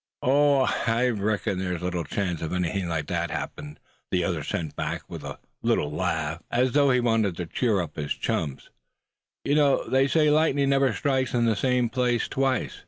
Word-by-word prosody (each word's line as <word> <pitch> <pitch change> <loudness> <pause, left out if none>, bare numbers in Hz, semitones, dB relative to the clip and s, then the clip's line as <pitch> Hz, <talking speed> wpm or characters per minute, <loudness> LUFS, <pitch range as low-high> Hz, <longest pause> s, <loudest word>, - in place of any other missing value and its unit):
"Oh! 140 +1 +4 0.3
I 115 +2 +2
reckon 105 -3 -1
there's 90 -2 -3
little 90 -1 -2
chance 90 +1 -3
of 80 - -3
anything 90 +1 -1
like 80 -3 -2
that - - -2
happening," 75 0 -6 0.3
the 90 -1 +1
other 85 -4 -1
sent 80 +1 -4
back, - - -3
with - - -8
a - - -6 0.2
little 75 - +1
laugh, 80 +1 -2
as 125 +1 +2
though 140 0 +4
he 125 -1 +3
wanted 115 -7 +1
to 90 - -3
cheer 100 0 0
his 75 -1 -3
chums 70 -4 -3
up; - - -25 0.7
"you 140 - 0
know, 145 -2 +3
they 135 +1 +3
say 150 +1 +3
lightning 145 -3 +2
never 135 -1 +3
strikes 130 0 0
in 120 -1 +2
the 115 -2 +2
same 125 +3 +1
place 120 -1 0
twice. 135 -1 -1
115 Hz, 185 wpm, -26 LUFS, 90-135 Hz, 0.7 s, Oh